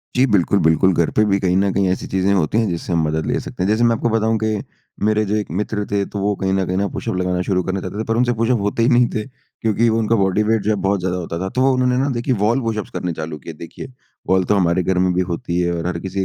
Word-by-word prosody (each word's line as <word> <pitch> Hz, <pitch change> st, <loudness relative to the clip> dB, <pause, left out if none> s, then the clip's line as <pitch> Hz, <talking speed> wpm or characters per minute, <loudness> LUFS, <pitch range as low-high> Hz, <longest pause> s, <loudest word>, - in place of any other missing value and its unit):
जी। 130 Hz, -, +4 dB
बिल्कुल, 100 Hz, 0 st, +3 dB
बिल्कुल 80 Hz, +3 st, +3 dB
घर 85 Hz, -1 st, +1 dB
पे 105 Hz, -, +4 dB
भी 100 Hz, -1 st, +2 dB
कहीं 90 Hz, -2 st, +1 dB
न 100 Hz, 0 st, +2 dB
कहीं 100 Hz, 0 st, +1 dB
ऐसी 95 Hz, -, -2 dB
चीज़ें 95 Hz, +1 st, +1 dB
होती 95 Hz, +1 st, +1 dB
हैं, 115 Hz, -1 st, +2 dB
जिससे 85 Hz, +1 st, -3 dB
हम 85 Hz, -1 st, +2 dB
मदद 80 Hz, +1 st, -1 dB
ले -, -, 0 dB
सकते -, -, -5 dB
हैं। -, -, +1 dB
जैसे 110 Hz, +3 st, +2 dB
मैं 115 Hz, -1 st, +4 dB
आपको 120 Hz, -, -1 dB
बताऊँ 110 Hz, 0 st, +1 dB
कि 110 Hz, -1 st, 0 dB, 0.4 s
मेरे 110 Hz, 0 st, +2 dB
जो 105 Hz, +1 st, -1 dB
एक 105 Hz, -1 st, -2 dB
मित्र 105 Hz, +3 st, -2 dB
थे, 100 Hz, -1 st, +1 dB
तो 100 Hz, -, -6 dB
वो 100 Hz, +1 st, 0 dB
कहीं 95 Hz, 0 st, +1 dB
न 95 Hz, -1 st, +1 dB
कहीं 95 Hz, +2 st, 0 dB
पुशअप -, -, -4 dB
लगाना 90 Hz, 0 st, -1 dB
शुरू 90 Hz, 0 st, 0 dB
करना 95 Hz, +1 st, -2 dB
चाहते 95 Hz, +3 st, -6 dB
थे, -, -, -1 dB
पर 115 Hz, 0 st, -1 dB
उनसे 120 Hz, 0 st, +2 dB
पुशअप 115 Hz, +1 st, +1 dB
होते 105 Hz, +3 st, 0 dB
ही 120 Hz, -, +4 dB
नहीं 120 Hz, -1 st, +4 dB
थे, 110 Hz, -, -1 dB, 0.4 s
क्योंकि 115 Hz, +1 st, +2 dB
उनका 115 Hz, 0 st, +1 dB
बॉडी 100 Hz, 0 st, +2 dB
वेट 110 Hz, 0 st, +1 dB
जो 105 Hz, -, -1 dB
है -, -, +2 dB
बहुत 100 Hz, +1 st, +1 dB
ज़्यादा 90 Hz, 0 st, -2 dB
होता 85 Hz, -1 st, -4 dB
था। 95 Hz, +1 st, -3 dB
तो 130 Hz, +5 st, +2 dB
उन्होंने 125 Hz, -1 st, +1 dB
ना 135 Hz, +2 st, +1 dB
देखिए 130 Hz, +2 st, 0 dB
वॉल 115 Hz, +5 st, +2 dB
पुशप 110 Hz, -4 st, -2 dB
करने 90 Hz, -1 st, -3 dB
चालू 80 Hz, 0 st, -5 dB
किए। 80 Hz, -, -9 dB
देखिए, 85 Hz, +10 st, -10 dB, 0.4 s
वॉल 95 Hz, 0 st, +3 dB
तो 105 Hz, -, +2 dB
हमारे 90 Hz, -1 st, +2 dB
घर 95 Hz, +1 st, 0 dB
में 90 Hz, 0 st, +2 dB
भी 90 Hz, -, +1 dB
होती 85 Hz, +1 st, -2 dB
है 85 Hz, -1 st, +1 dB
और 85 Hz, 0 st, -3 dB
हर 90 Hz, -2 st, -2 dB
किसी 95 Hz, +2 st, -5 dB
100 Hz, 290 wpm, -19 LUFS, 90-110 Hz, 0.4 s, जी